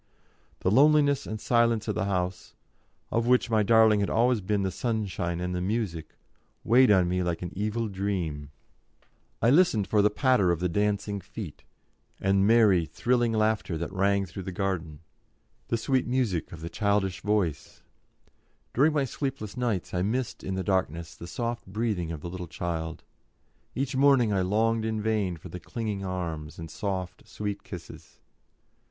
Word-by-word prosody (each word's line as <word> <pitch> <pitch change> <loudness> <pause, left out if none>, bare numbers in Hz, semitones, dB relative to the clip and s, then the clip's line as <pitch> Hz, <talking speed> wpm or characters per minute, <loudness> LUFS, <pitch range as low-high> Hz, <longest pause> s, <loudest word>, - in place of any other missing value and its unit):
The 95 - +1
loneliness 145 +2 +4
and 110 - -4
silence 115 -1 +2
of - - 0
the 110 - -1
house, 90 -2 -3 0.6
of 115 +1 +1
which 125 -1 +3
my 110 -1 +4
darling 110 0 +5
had 100 - 0
always 120 0 +2
been 100 +1 0
the 95 - -1
sunshine 95 -6 -2
and 90 0 -2
the 90 - -2
music, 90 -5 -3 0.5
weighed 125 +3 +5
on 95 -4 +5
me 90 +1 0
like 85 -1 -2
an 90 - -5
evil 110 +3 -1
dream; 95 -8 -3 0.9
I 115 - +5
listened 145 - +4
for 105 +1 +2
the 105 - +4
patter 125 -4 +2
of 85 -2 +1
the 90 - +1
dancing 105 +2 -1
feet, - - -8 0.6
and 95 +1 +2
merry, 105 -7 +5
thrilling 120 -1 +1
laughter 110 -6 0
that 85 +3 -5
rang 100 +1 +2
through 95 +2 -8
the 95 - -5
garden, 90 -5 -3 0.7
the 115 - 0
sweet 130 +2 0
music 120 -9 0
of 80 - -9
the 85 - -5
childish 100 -3 0
voice; 105 -7 -1 0.9
during 150 +5 +4
my 145 -3 +1
sleepless 135 -6 -4
nights 120 -7 -2
I 90 - 0
missed 120 +6 -2
in 95 - -3
the 95 - -2
darkness 85 -4 -1
the 85 - -9
soft 115 +6 -4
breathing 100 -4 -2
of 80 -3 -6
the 85 - -5
little 90 -1 -6
child; 80 -1 -4 0.7
each 135 0 -2
morning 130 -5 +4
I 95 - +2
longed 110 +4 +1
in 110 -1 -1
vain 105 -5 0
for 90 - -11
the 90 - -7
clinging 110 -4 -4
arms 85 -5 -4
and 80 -2 -8
soft, 95 -2 -4
sweet 105 -1 -5
kisses. - - -11
100 Hz, 170 wpm, -27 LUFS, 90-115 Hz, 0.9 s, darling